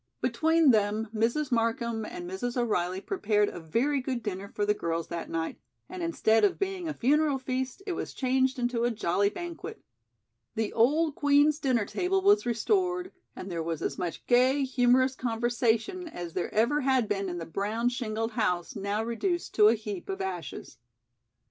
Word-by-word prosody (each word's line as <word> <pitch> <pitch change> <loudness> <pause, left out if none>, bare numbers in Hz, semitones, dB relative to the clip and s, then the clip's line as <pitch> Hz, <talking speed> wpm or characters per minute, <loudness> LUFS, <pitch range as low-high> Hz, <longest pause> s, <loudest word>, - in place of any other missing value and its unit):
Between 320 -2 +3
them, 215 0 +1
Mrs. 235 +6 0
Markham 230 -1 0
and 175 -4 -7
Mrs. 235 +7 -4
O'Reilly 190 -6 0
prepared 210 - +1
a - - -8
very 245 - 0
good 255 -2 -3
dinner 200 -1 -4
for 205 - -2
the 210 - +3
girls 165 -4 -3
that 170 -1 -5
night, 165 0 -3 0.3
and 370 -1 -7
instead 225 -10 +2
of 205 - +3
being 385 -3 -3
a 310 - -2
funeral 290 +2 +2
feast 260 +5 -4
it 395 - -2
was 345 - -5
changed 260 0 +1
into 240 -1 0
a 240 - +3
jolly 200 -3 +1
banquet. 345 +5 -7 0.8
The 220 -1 -1
old 295 +7 +3
Queen's 290 +1 +3
dinner 250 -7 +1
table 380 - 0
was 410 - +4
restored 360 - 0 0.2
and 185 - -7
there 170 -1 -2
was 165 -1 -3
as - - -3
much 175 -3 -4
gay, 260 +3 +4
humorous 255 0 +3
conversation 240 - 0
as 175 - -7
there 180 - -2
ever 235 +8 +2
had 260 -4 +2
been 200 -2 -1
in 175 - -4
the 165 - -5
brown 210 +8 -1
shingled 225 -2 -3
house 180 -8 -1
now 205 +2 -2
reduced 345 - -2
to 210 -1 +6
a 225 - +5
heap 210 -4 -6
of 190 - -3
ashes. 175 -10 -6
235 Hz, 175 wpm, -28 LUFS, 205-280 Hz, 0.8 s, to